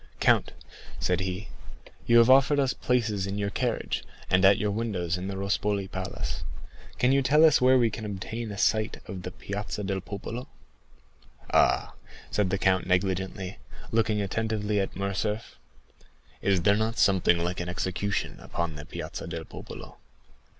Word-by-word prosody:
"Count," - - +3 0.5
said 90 -1 +1
he, 95 +2 -4 0.6
"you 120 - +6
have 115 -1 +7
offered 135 +2 +5
us 135 -2 +2
places 110 -6 0
in 100 +1 -3
your 100 -1 -1
carriage, - - -1 0.3
and 95 +1 +4
at 100 +1 +7
your 105 +1 0
windows 100 -6 -1
in 90 +1 -4
the 100 - -4
Rospoli 100 0 0
Palace. 95 0 -4 0.5
Can 125 - +3
you 135 0 +4
tell 150 +5 +5
us 155 -5 +5
where 130 +1 +6
we 120 -3 +3
can 110 - -6
obtain 105 +2 -5
a 100 - -6
sight 110 +2 +1
of 95 -3 -6
the 90 - -5
Piazza 105 +2 -5
del 95 0 -2
Popolo?" 115 +6 -6 1.1
"Ah," - - +3 0.4
said 105 -3 +1
the 100 - 0
count 95 -1 +2
negligently, 95 0 -1 0.3
looking 110 -2 +2
attentively 105 0 -1
at 95 - -2
Morcerf, 100 - -3 0.8
"is 95 -4 +2
there 100 +3 +5
not 110 +2 -1
something 95 -3 +4
like 85 +2 -2
an 90 0 -3
execution 95 +2 -2
upon 85 -1 -3
the 75 - -8
Piazza - - -6
del - - -5
Popolo?" - - -10
100 Hz, 160 wpm, -27 LUFS, 95-110 Hz, 1.1 s, have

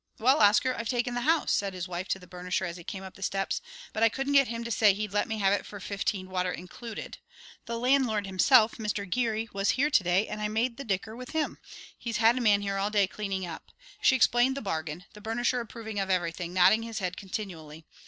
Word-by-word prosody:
"Well, 260 +6 +4
Oscar, 215 +5 +5
I've 230 -2 -4
taken 245 0 0
the 245 - -1
house!" 320 +4 +2
said 195 -2 0
his 180 0 -4
wife 180 +1 -4
to - - 0
the 180 - -14
burnisher 180 +1 -3
as 170 - -6
he 175 - -10
came 190 +3 -6
up 190 - -9
the - - -16
steps. 195 0 -1 0.3
"But 215 - -3
I 225 - +6
couldn't 270 +4 -2
get 275 -2 +6
him 230 0 -4
to 235 - -5
say 220 -1 +4
that 200 - +6
he'd 210 -2 -4
let 205 - +1
me 225 - -3
have 195 -1 +3
it 205 - 0
for 205 - -9
fifteen, 195 -1 -2
water 180 -1 0
included. 210 +7 -8 0.5
The 235 0 -3
landlord 245 -4 +2
himself, 215 +4 +4
Mr. 210 -2 -3
Geary, 225 +2 0
was 195 0 0
here 290 +3 +2
to 205 - +4
day 180 +4 +2
and 210 0 -5
I 210 - 0
made 230 +3 -1
the 275 - -5
dicker 215 -1 -2
with 250 +3 -9
him. 315 -1 -1 0.4
He's 230 -2 -4
had 225 +2 +5
a 255 - -1
man 205 -3 +4
here 200 -1 -2
all 195 +1 0
day 205 -2 +3
cleaning 190 -1 -4
up." 165 -2 -9 0.3
She 265 - +5
explained 250 +2 +3
the - - -3
bargain, 160 -2 -4
the 210 - -13
burnisher 240 +3 0
approving 220 -2 -6
of 195 -1 -2
everything, 175 -1 -1
nodding 185 +5 +5
his 230 -1 -6
head 180 -2 -2
continually. 165 -6 -7
210 Hz, 240 wpm, -28 LUFS, 190-235 Hz, 0.5 s, I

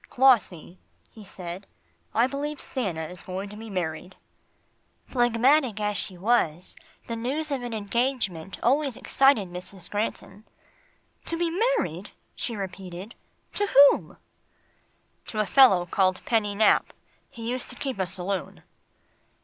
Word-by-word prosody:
"Clossie," 195 -9 +2 0.3
he 220 - -13
said, 185 0 -8 0.4
"I 230 - +3
believe 285 +3 -3
Stanna 190 - -3
is 180 +1 -11
going 190 +2 -5
to 210 - -10
be 225 +1 -9
married." 180 -1 -4 0.9
Phlegmatic 240 0 +2
as 210 0 -1
she 185 - -4
was, 180 -5 +1 0.3
the 230 - -4
news 280 +7 -2
of 275 -2 -1
an 240 -2 -4
engagement 210 -5 -1
always 275 +1 +2
excited 270 -9 +3
Mrs. 180 +1 -9
Granton. 205 -1 -3 0.8
"To 335 - -2
be 335 -1 0 0.3
married," 175 - -3 0.3
she 235 - -3
repeated, 190 +1 -7 0.4
"to 410 - 0
whom?" 280 -4 +5 1.1
"To 215 - -4
a 215 - +3
fellow 195 -5 +6
called 185 +1 +1
Penny 210 -3 +1
Nap 215 +1 +3 0.4
he 230 -1 -8
used 255 0 -4
to - - -8
keep 265 -7 -4
a 190 - 0
saloon." 190 +1 -3
210 Hz, 135 wpm, -26 LUFS, 185-255 Hz, 1.1 s, fellow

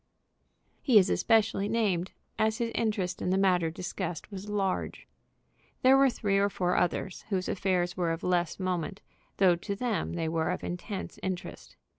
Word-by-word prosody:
He 250 -6 +5
is 195 -2 +5
especially 220 -3 +2
named, 195 -6 0 0.3
as 220 0 +2
his 230 -1 -1
interest 210 -5 -1
in - - -1
the 190 - +2
matter 180 -4 +3
discussed 175 +1 -5
was 200 +1 -7
large. 195 -2 -2 0.8
There 260 +1 +7
were 270 0 +5
three 200 -4 0
or 200 +1 +3
four 180 -2 0
others, 180 +1 -1
whose 185 -3 -1
affairs 180 -2 0
were 175 -2 0
of 165 +1 -4
less 175 -1 0
moment, 185 0 -2 0.4
though 185 -3 +5
to 200 +3 -4
them 220 -5 -2
they 165 -2 -2
were 160 0 0
of 180 - -3
intense 190 +3 -5
interest. 185 0 -5
190 Hz, 165 wpm, -29 LUFS, 180-210 Hz, 0.8 s, There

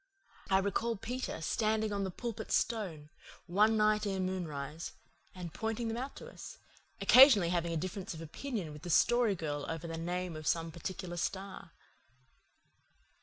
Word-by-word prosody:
I 190 - +5
recall 200 +4 0
Peter 245 -1 -4
standing 215 +4 0
on 200 -1 -1
the 190 - -1
Pulpit 230 +4 -5
Stone, 180 -10 -1 0.4
one 210 +5 +3
night 215 0 +3
ere 195 -1 -1
moonrise, 165 -5 -3 0.4
and 175 -3 -7
pointing 225 +1 -2
them 225 - -2
out 265 +3 -5
to 480 - -9
us, - - -10 0.4
occasionally 245 - +8
having 170 -1 0
a 165 - -1
difference 185 +2 -4
of 160 - -8
opinion 180 - -5
with 150 - -10
the 175 - -7
Story 235 +4 +4
Girl 145 -4 -3
over 165 0 -4
the 165 -1 -4
name 175 0 -3
of 155 -1 -6
some 165 -1 +1
particular 175 +1 -5
star. 190 -1 -4
190 Hz, 160 wpm, -33 LUFS, 165-220 Hz, 0.4 s, occasionally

